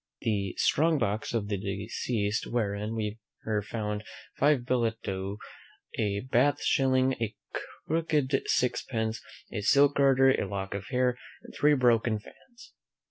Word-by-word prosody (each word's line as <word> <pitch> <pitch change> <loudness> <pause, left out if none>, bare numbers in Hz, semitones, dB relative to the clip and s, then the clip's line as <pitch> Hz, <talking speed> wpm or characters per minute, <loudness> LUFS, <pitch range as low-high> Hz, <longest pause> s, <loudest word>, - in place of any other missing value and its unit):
The 100 -4 -1
strong 160 +2 +3
box 110 -4 -1
of 110 -4 -1
the 100 -1 -1
deceased, 105 +2 -2
wherein 105 -1 -2 0.5
were 110 -1 0
found 105 0 -4 0.3
five 140 -3 +3
billet 115 -3 0
doux, 95 +1 -3 0.6
a 100 -2 0
Bath 130 +3 +2
shilling, 130 -1 +3
a 110 -1 -2 0.5
crooked 150 -4 +1
sixpence, 110 -3 0 0.3
a 105 - -3
silk 140 +7 +4
garter, 135 -1 +5
a 100 - -1
lock 95 0 -4
of 100 -1 -5
hair, 125 -1 +1 0.2
and - - -13
three 150 0 +4
broken 120 -3 +3
fans. 240 - -16
115 Hz, 135 wpm, -29 LUFS, 105-130 Hz, 0.6 s, garter